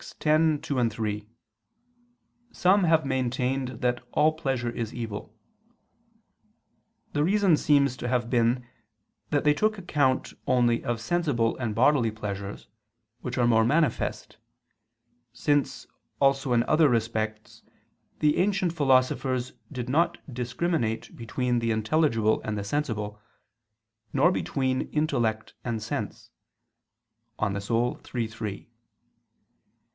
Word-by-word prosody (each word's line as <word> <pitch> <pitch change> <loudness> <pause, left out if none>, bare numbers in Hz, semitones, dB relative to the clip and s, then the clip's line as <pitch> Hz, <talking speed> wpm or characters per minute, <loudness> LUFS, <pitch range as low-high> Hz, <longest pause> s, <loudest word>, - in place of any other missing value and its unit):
_ - - -13
x, - - -11 0.5
2, 125 -5 +1
3, 105 -1 -4 1.2
some 190 -1 +3
have 160 -2 +3
maintained 130 0 -1
that 125 -1 0
all 155 +1 +4
pleasure 135 -7 -2
is 115 -1 -5
evil. 110 -4 -5 1.8
The 145 - +2
reason 195 0 +4
seems 140 -3 +3
to 125 - -4
have 125 -1 0
been 120 +1 +1 0.6
that 145 -2 +1
they 150 - +5
took 215 +7 +1
account 145 -8 0
only 120 -2 +2
of 120 -1 -2
sensible 125 -4 0
and 115 -5 -3
bodily 125 0 +4
pleasures 100 -2 -6 0.5
which 125 +1 -5
are 120 - +3
more 115 -1 +4
manifest; 150 +2 0 1.0
since, 145 +3 0 0.3
also 135 -1 +2
in 120 -1 +4
other 155 +3 +4
respects, 110 -2 -2 0.6
the 150 -1 +3
ancient 190 -2 +1
philosophers 130 -3 +1 0.2
did 125 -3 -5
not 155 +7 +2 0.2
discriminate 120 -1 -2
between 120 +1 -1
the 115 0 -1
intelligible 115 -1 +2
and 110 -1 -3
the 100 - -3
sensible, 105 -4 -3 0.9
nor 145 +6 +4
between 130 -7 -1
intellect 120 -8 -1
and 115 -2 -2
sense - - -5 1.1
(De - - 0
Anima 110 +4 0
iii, - - -14 0.3
3). 110 -2 -6
125 Hz, 115 wpm, -27 LUFS, 115-145 Hz, 1.8 s, they